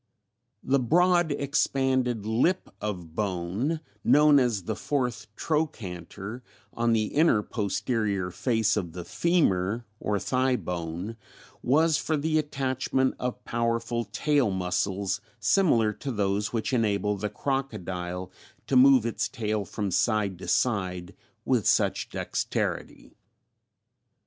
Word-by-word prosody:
The 135 +1 +2
broad 175 +5 +3
expanded 130 -5 0
lip 120 +12 +1
of 90 -6 -5
bone 100 - -2 0.2
known 150 -1 +6
as 120 -7 0
the 110 +4 -3
fourth 125 -4 -2
trochanter, 110 - -3 0.3
on 115 0 +1
the 110 -1 +2
inner 145 -8 +4
posterior 105 -3 -1
face 110 +1 +1
of 90 -6 -3
the 90 -1 -7
femur 115 - +1
or 105 -1 0
thigh 130 +6 +1
bone 90 +2 -4 0.4
was 155 +4 +3
for 155 - 0
the 155 +2 +1
attachment 130 -2 0
of 125 0 -4
powerful 115 0 -1
tail 125 +5 +1
muscles 95 +1 -1 0.2
similar 115 - +3
to 135 +5 -5
those 100 -2 0
which 115 +2 -2
enable 105 -3 +1
the 105 +1 -3
crocodile 95 -11 -3 0.3
to 135 - -1
move 130 -2 +7
its 115 - -1
tail 110 -5 -2
from 100 -1 -3
side 100 -1 +1
to - - -8
side 95 -7 0 0.3
with - - +2
such - - +2
dexterity. - - -3
115 Hz, 120 wpm, -27 LUFS, 100-135 Hz, 0.4 s, move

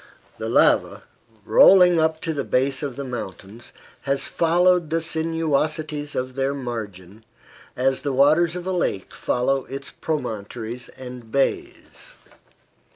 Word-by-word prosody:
The - - -3
lava, - - +3 0.4
rolling 180 - +6
up 160 0 +1
to 165 - -2
the 140 -2 -2
base 135 +2 0
of 140 -4 -4
the 140 - -5
mountains, 115 -3 -8 0.3
has 140 0 -1
followed 175 0 +2
the 165 +1 +1
sinuosities 155 -2 -2
of 130 0 -3
their 135 +1 -1
margin, 110 -6 -7 0.5
as 130 +1 +1
the 145 - -2
waters 155 +6 +3
of 180 0 -6
a 190 - -2
lake 170 - -2
follow 135 +2 0
its 135 0 -7
promontories 120 -4 -5
and 125 -3 -10
bays. 140 -1 -3
140 Hz, 130 wpm, -23 LUFS, 125-160 Hz, 0.5 s, rolling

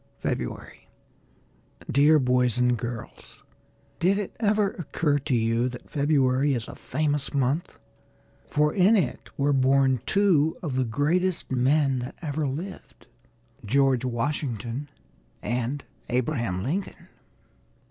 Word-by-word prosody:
FEBRUARY 60 -1 -4 1.0
Dear 145 +4 +5
Boys 125 -3 +2
and 125 0 +3
Girls 120 -1 -8 0.6
Did 190 +4 +3
it 205 -2 -4
ever 210 -2 +2
occur 150 -3 -1
to 135 -1 -1
you 115 +2 +1
that 125 -1 -11
February 140 -2 +2
is 115 -2 -4
a - - -8
famous 145 0 -2
month, 140 +5 0 0.7
for 150 0 +2
in 200 +3 +5
it 145 -11 -2
were 145 +1 +2
born 135 -2 +3
two 170 -6 +3
of 145 -6 -3
the 130 -1 +1
greatest 165 +10 0
men 135 +1 +2
that 125 +2 -6
ever 150 -2 -2
lived, 160 +9 -7 0.6
George 130 +2 +2
Washington 125 0 -3 0.5
and 125 +4 -2 0.3
Abraham 120 -7 -1
Lincoln? 185 - -4
140 Hz, 115 wpm, -26 LUFS, 125-155 Hz, 1.0 s, Dear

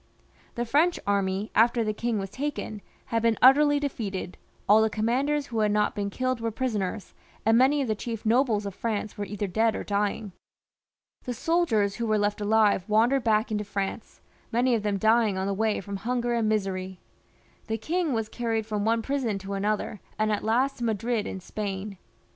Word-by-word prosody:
The 240 - -1
French 310 +9 +2
army, 200 0 0
after 235 +1 +4
the 215 -1 -1
king 230 +1 -1
was 195 -1 -4
taken, 260 -5 -4 0.3
had 230 - +2
been 230 -1 +2
utterly 290 +3 +6
defeated, 200 -10 -4 0.3
all 215 +2 +6
the 220 - +3
commanders 260 +8 0
who 230 -4 -3
had 210 -1 +2
not 210 0 +1
been 200 -1 -2
killed 255 +2 -2
were 230 - 0
prisoners, 215 -4 -3 0.3
and 225 +1 +5
many 275 +4 +4
of - - -3
the 220 - +1
chief 225 +1 -6
nobles 225 -2 +2
of 200 - -4
France 215 0 -3
were 205 - -4
either 205 0 -3
dead 220 +4 +1
or - - -4
dying. 205 0 -1 0.9
The 245 - -3
soldiers 225 - +1
who 235 -1 -2
were 215 0 +2
left 205 0 0
alive 210 -2 +3
wandered 235 +5 +3
back 220 0 +2
into 210 -1 -1
France, 200 +1 -5 0.3
many 245 +2 +2
of 225 - +1
them 205 -1 -1
dying 220 -1 +3
on 190 - -1
the 200 - 0
way 215 +1 0
from 200 +1 -5
hunger 240 +3 -1
and 230 -2 +1
misery. 190 -3 -2 0.7
The 225 0 -1
king 325 - -1
was 225 -3 -1
carried 225 -2 -2
from 210 -2 -2
one 225 +1 +1
prison 260 -7 -1
to 195 +1 -6
another, 210 +1 -1 0.2
and 215 0 +1
at 210 - -1
last 250 +5 +1
to - - -4
Madrid 225 0 -1
in 190 - -5
Spain. 195 0 -5
220 Hz, 195 wpm, -27 LUFS, 205-240 Hz, 0.9 s, utterly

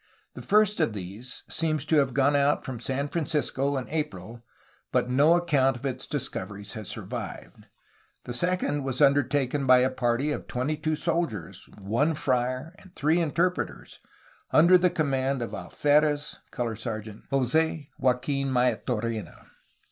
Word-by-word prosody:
The - - -9
first 210 -1 +3
of 155 -9 +1
these 105 +6 -4
seems 155 -3 0
to 155 +1 +2
have 135 -4 +2
gone 140 +1 +3
out 145 +1 +2
from 130 -3 -5
San 135 +4 -2
Francisco 145 -3 -1
in 130 - -4
April, 120 - -4 0.5
but 125 - +1
no 145 +6 +5
account 140 -7 +2
of 125 - -9
its 130 -1 -3
discoveries 105 -7 -4
has 110 -3 -7
survived. - - -7 0.6
The 120 - -6
second 145 -1 0
was 130 -1 -3
undertaken 140 -1 +2
by 125 0 +7
a 130 +1 +2
party 130 +3 0
of - - -4
twenty 130 +5 -1
two 155 +1 -1
soldiers, 165 - -3
one 120 +11 0
friar, 130 +3 -1
and 190 - -17
three 160 +4 +2
interpreters, 170 +3 -2 0.5
under 170 +4 +6
the 180 0 +5
command 135 -5 0
of 115 - -6
Alferez 150 0 +1
(Color 115 -2 -3
Sergeant) 110 -1 -7
Jos6 145 +3 +1
Joaqufn 135 +2 +1
Maitorena. 115 - -1
135 Hz, 145 wpm, -27 LUFS, 125-155 Hz, 0.6 s, by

